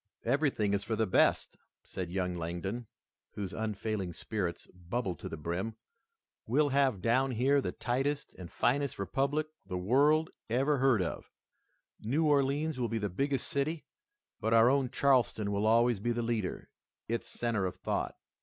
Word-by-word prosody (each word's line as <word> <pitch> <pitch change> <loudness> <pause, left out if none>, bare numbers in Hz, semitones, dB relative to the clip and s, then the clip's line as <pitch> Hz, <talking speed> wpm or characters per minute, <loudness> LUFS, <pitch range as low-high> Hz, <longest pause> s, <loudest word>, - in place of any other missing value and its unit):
"Everything 135 -8 +1
is 100 0 0
for 110 - -2
the 110 - +1
best," 95 - +2 0.3
said 90 -2 -5
young 90 0 -1
Langdon, 90 +7 -4 0.5
whose 100 -3 -5
unfailing 110 -4 -3
spirits 85 -2 -3
bubbled 90 +2 -3
to - - -6
the 80 - -6
brim, 85 +8 -3 0.7
"we'll 150 -1 +3
have 135 -8 +2
down 130 +4 +3
here 130 +4 +2
the - - -2
tightest 135 +4 -2
and 90 -3 -10
finest 140 +1 +1
republic 140 +9 0 0.2
the 95 -2 -4
world 145 - +3 0.2
ever 135 +4 +2
heard 125 -7 +4
of. 85 - -5 0.7
New 140 +9 0
Orleans 145 0 +2
will 120 -2 0
be 115 - -1
the 105 -2 -1
biggest 135 +8 -1
city, 155 +1 -1 0.5
but 115 0 +2
our 115 +2 +6
own 135 -2 +2
Charleston 120 -6 +2
will 100 +1 +1
always 115 0 +4
be 120 +4 0
the 120 0 -1
leader, 115 -5 -2 0.4
its 115 +1 -2
center 115 -5 -1
of 90 - -5
thought." - - -2
115 Hz, 160 wpm, -31 LUFS, 100-135 Hz, 0.7 s, our